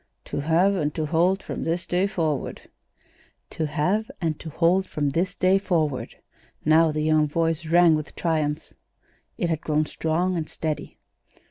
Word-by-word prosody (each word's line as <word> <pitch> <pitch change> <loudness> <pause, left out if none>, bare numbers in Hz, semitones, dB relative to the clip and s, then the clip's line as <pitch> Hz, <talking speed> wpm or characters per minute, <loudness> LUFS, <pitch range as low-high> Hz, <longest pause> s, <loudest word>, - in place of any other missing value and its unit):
"To - - -4
have 165 +7 +3
and 150 -6 0
to 155 - -1
hold 175 +5 +2
from - - -5
this 170 +2 -1
day 180 +3 +1
forward." 160 -8 -3 0.8
"'To 160 - -2
have 185 +9 0
and 160 -3 -2
to 160 - -7
hold 180 +5 +2
from 145 -2 -1
this 180 +6 -1
day 185 +2 +3
forward.'" 160 -8 -1 0.5
Now 160 +1 +5
the 155 0 -2
young 155 -1 +3
voice 165 +1 -1
rang 170 0 +5
with 155 -1 -3
triumph. 155 -2 -1 0.6
It 175 - -1
had 160 -1 -1
grown 155 0 +1
strong 170 +4 -1
and 160 -2 -3
steady. 155 -2 -4
165 Hz, 160 wpm, -24 LUFS, 155-180 Hz, 0.8 s, Now